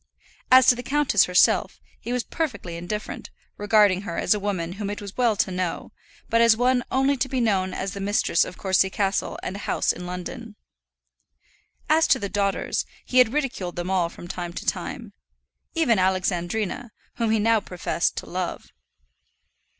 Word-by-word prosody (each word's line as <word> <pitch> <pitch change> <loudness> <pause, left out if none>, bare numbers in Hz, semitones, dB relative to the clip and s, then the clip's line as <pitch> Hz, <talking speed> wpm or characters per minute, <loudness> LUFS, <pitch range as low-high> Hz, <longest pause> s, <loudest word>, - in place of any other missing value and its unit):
As 255 0 +8
to - - +7
the 245 - -6
countess 275 -6 +2
herself, 180 0 +3 0.2
he 240 - -6
was 250 -1 0
perfectly 255 - -4
indifferent, 175 +5 -5 0.3
regarding 205 -2 +3
her 200 -4 -5
as 180 - +3
a 210 - -2
woman 190 -4 -2
whom 200 +1 -4
it 205 - -4
was 200 -1 -9
well 240 -4 +2
to 190 - 0
know, 180 -2 -3 0.4
but 230 - +2
as 230 -1 +5
one 250 +1 +2
only 270 +2 +2
to 265 - -1
be 260 - -1
known 195 -5 +1
as 190 +1 -4
the 200 - -6
mistress 200 -3 +2
of 180 - -8
Courcy 190 -1 +2
Castle 195 0 -1
and 190 - -4
a 200 - -8
house - - +2
in 180 0 -8
London. 210 +5 -7 1.3
As 320 +1 +4
to - - +4
the 200 - -4
daughters, 200 0 -1 0.2
he 255 - +2
had 250 -3 +5
ridiculed 265 -11 -2
them 175 +2 -3
all 180 -3 +1
from 175 - -11
time 175 -1 -5
to - - -7
time - - -4 0.6
even 255 -11 +3
Alexandrina, 185 +4 -1 0.3
whom 230 -2 0
he 220 - +3
now 225 +1 +3
professed 180 -3 -2
to - - -4
love. - - -5
205 Hz, 180 wpm, -24 LUFS, 185-240 Hz, 1.3 s, As